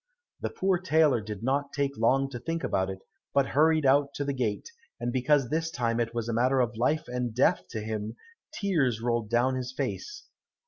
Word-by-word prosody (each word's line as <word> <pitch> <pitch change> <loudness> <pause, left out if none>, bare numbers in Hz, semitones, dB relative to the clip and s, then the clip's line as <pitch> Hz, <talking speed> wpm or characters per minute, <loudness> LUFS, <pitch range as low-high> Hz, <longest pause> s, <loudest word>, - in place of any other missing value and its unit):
The - - -2
poor 190 -1 0
tailor 155 -8 +3
did 105 0 -7
not 140 +2 0
take 140 -1 -1
long 135 +5 +2
to 120 - -5
think 165 +7 -3
about 95 0 0
it, 95 0 -7 0.3
but 140 -1 +3
hurried 155 +1 +3
out 140 +1 +3
to 145 - -2
the 140 - -1
gate, 125 - -2 0.3
and 120 - -2
because 130 0 +2
this 160 +1 0
time 120 -5 -1
it 115 -1 0
was 115 -1 -2
a 120 - -1
matter 130 +3 +2
of 120 -2 +1
life 130 +7 0
and 125 -2 -3
death 125 - +2
to 110 - -4
him, 110 +1 -4 0.4
tears 165 - 0
rolled 115 -2 -1
down 120 +3 +2
his 130 -1 -3
face. 390 - -4
130 Hz, 200 wpm, -28 LUFS, 115-145 Hz, 0.4 s, tailor